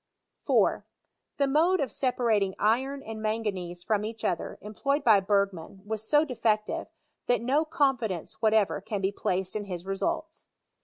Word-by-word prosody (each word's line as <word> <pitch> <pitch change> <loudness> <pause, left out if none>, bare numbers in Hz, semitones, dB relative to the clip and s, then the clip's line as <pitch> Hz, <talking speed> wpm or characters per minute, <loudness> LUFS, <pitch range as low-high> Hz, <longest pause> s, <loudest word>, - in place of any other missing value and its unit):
4. - - +3 0.5
The 280 - +2
mode 330 +7 +3
of 270 -4 -1
separating 225 -7 +1
iron 265 +6 +1
and 220 0 -7
manganese 200 -6 -2
from 210 0 0
each 220 +1 -5
other 170 - -2
employed 275 +8 -1
by 215 -4 +6
Bergman 195 -2 -1
was 215 0 -3
so 300 +1 +5
de 270 - -5
fective, 215 -2 0 0.4
that 245 - +3
no 285 +6 +2
confidence 260 - -1
whatever 215 -3 +3
can 210 0 -3
be 190 +1 +1
placed 190 -1 -2
ill 210 -1 -3
his 180 -2 -6
results. 320 - -3
215 Hz, 155 wpm, -28 LUFS, 195-270 Hz, 0.5 s, by